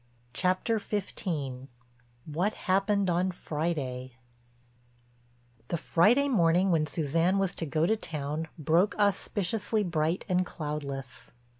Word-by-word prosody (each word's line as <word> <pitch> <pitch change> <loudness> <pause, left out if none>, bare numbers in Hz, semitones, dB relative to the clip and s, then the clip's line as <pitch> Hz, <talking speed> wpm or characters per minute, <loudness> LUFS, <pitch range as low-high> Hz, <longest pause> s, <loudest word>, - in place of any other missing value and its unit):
CHAPTER 185 - +1
XV—WHAT 135 - -4
HAPPENED 195 +1 +1
ON 180 +2 +1
FRIDAY 150 -7 -3 1.5
The 170 - -1
Friday 225 - +3
morning 180 -5 +3
when 155 -2 +2
Suzanne 165 +5 +1
was 195 -2 +1
to 165 - -4
go 155 +3 +1
to 220 - +3
town 155 -4 -4
broke 165 +6 +2
auspiciously 205 +1 +1
bright 165 -1 0
and 185 -2 +2
cloudless. 145 -6 -6
170 Hz, 105 wpm, -29 LUFS, 150-195 Hz, 1.5 s, Friday